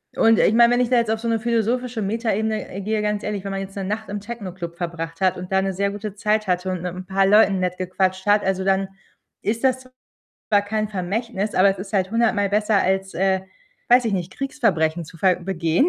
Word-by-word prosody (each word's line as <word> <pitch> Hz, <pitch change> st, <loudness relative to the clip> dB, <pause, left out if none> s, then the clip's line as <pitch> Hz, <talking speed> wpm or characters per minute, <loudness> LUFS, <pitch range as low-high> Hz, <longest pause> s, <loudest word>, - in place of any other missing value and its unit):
und 225 Hz, -1 st, +4 dB
ich -, -, +4 dB
meine, 235 Hz, +1 st, +6 dB
wenn 245 Hz, -, +2 dB
ich 245 Hz, -, +1 dB
da 250 Hz, -, +3 dB
jetzt 230 Hz, -2 st, +1 dB
auf 220 Hz, -, -1 dB
so 230 Hz, -, -4 dB
'ne 230 Hz, -1 st, +1 dB
philosophische 235 Hz, +1 st, -1 dB
Metaebene, 220 Hz, +1 st, -1 dB
äh, 195 Hz, -, -6 dB
gehe, 215 Hz, +2 st, -1 dB
ganz 210 Hz, 0 st, -1 dB
ehrlich, 205 Hz, -2 st, -3 dB
wenn 200 Hz, -, -4 dB
man 195 Hz, 0 st, -3 dB
jetzt 195 Hz, 0 st, -8 dB
'ne 195 Hz, -, -3 dB
Nacht 215 Hz, +3 st, -4 dB
im 205 Hz, +1 st, -3 dB
Techno-Club 190 Hz, -6 st, -7 dB
verbracht 170 Hz, 0 st, -5 dB
hat 185 Hz, -1 st, +2 dB
und 180 Hz, +1 st, -8 dB
da 190 Hz, 0 st, +3 dB
'ne 195 Hz, 0 st, -1 dB
sehr 200 Hz, +2 st, 0 dB
gute 205 Hz, 0 st, -6 dB
Zeit 215 Hz, 0 st, 0 dB
hatte 180 Hz, +1 st, 0 dB
und 185 Hz, -2 st, -3 dB
mit 180 Hz, -1 st, -4 dB
'n 185 Hz, 0 st, -7 dB
paar 195 Hz, +1 st, +2 dB
Leuten 200 Hz, -2 st, +5 dB
nett 180 Hz, 0 st, -1 dB
gequatscht 185 Hz, +1 st, -1 dB
hat, 205 Hz, 0 st, +4 dB
also, 190 Hz, 0 st, 0 dB
dann 195 Hz, 0 st, +1 dB, 0.5 s
ist 225 Hz, +3 st, -2 dB
das 260 Hz, -1 st, +2 dB, 0.7 s
zwar 205 Hz, -1 st, +4 dB
kein 215 Hz, +1 st, -2 dB
Vermächtnis, 205 Hz, +2 st, -3 dB
aber 195 Hz, +2 st, +5 dB
es 195 Hz, -, -4 dB
ist 195 Hz, +2 st, -8 dB
halt 190 Hz, -2 st, +1 dB
hundertmal 225 Hz, -3 st, +2 dB
besser 210 Hz, 0 st, +2 dB
als, 190 Hz, +1 st, -1 dB
äh, 190 Hz, 0 st, +1 dB, 0.5 s
weiß 245 Hz, +1 st, +6 dB
ich 220 Hz, -, 0 dB
nicht, 180 Hz, -1 st, -4 dB
Kriegsverbrechen 175 Hz, -, 0 dB
zu 160 Hz, -, -13 dB
ver 185 Hz, 0 st, +3 dB
begehen. 175 Hz, -, +1 dB
200 Hz, 235 wpm, -22 LUFS, 185-220 Hz, 0.7 s, meine